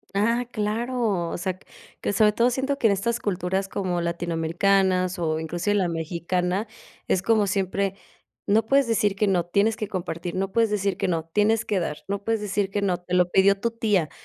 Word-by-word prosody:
Ah, 230 +4 +2
claro, 215 -4 -1
o - - -4
sea, 185 +1 -2
q - - -24 0.4
que - - -1
sobre 210 +1 +4
todo 235 +4 +2
siento 270 +3 -1
que 225 - +4
en 200 - +3
estas 235 +5 -1
culturas 190 -1 -2
como 180 -3 -2
latinoamericanas 175 +2 +1
o 160 -2 0
inclusive 175 +6 -1
la 190 -3 +2
mexicana, 175 +4 -2 0.4
es 185 - +1
como 215 +1 +3
siempre: 195 0 -1 0.5
"No 215 +2 +3
puedes 275 +2 +3
decir 210 -3 +1
que 210 +1 +1
no, 180 -3 +2
tienes 200 +5 +2
que 215 -2 -4
compartir, 175 -3 -4
no 190 +1 -2
puedes 225 0 +2
decir 200 -2 0
que - - -1
no, 165 -3 -1
tienes 210 +3 +2
que 200 -3 0
dar, 150 -3 -3
no 200 0 -3
puedes 225 -1 0
decir 200 -1 -1
que 205 0 -1
no, 185 -3 +1
te 175 0 -8
lo 180 -1 +3
pidió 195 +1 +4
tu 235 - 0
tía. 210 -8 0
195 Hz, 200 wpm, -24 LUFS, 180-215 Hz, 0.5 s, sobre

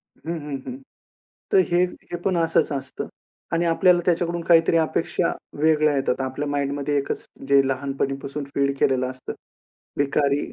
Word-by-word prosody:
हं, 165 0 -7
हं, 145 -2 -4
हं. 255 +1 -5 0.8
तर 395 - +6
हे, 175 +1 +4 0.3
हे 175 - -1
पण 190 -2 +1
असंच 165 -2 +2
असतं. 140 -1 -5 0.4
आणि 170 +1 +2
आपल्याला 175 +1 +4
त्याच्याकडून 170 -1 0
काहीतरी 165 -1 +5
अपेक्षा 160 - 0 0.3
वेगळ्या 155 -1 +3
येतात. 135 - +1
आता 135 - -3
आपल्या 145 +3 -3
माइंडमध्ये 145 0 -1
एकच 140 - -3 0.2
जे 140 0 +6
लहानपणीपासून 135 +1 -3
फीड 140 0 +2
केलेलं 130 -1 +2
असतं. 130 0 -7 0.7
भिकारी 140 0 +1
145 Hz, 150 wpm, -23 LUFS, 140-165 Hz, 0.8 s, तर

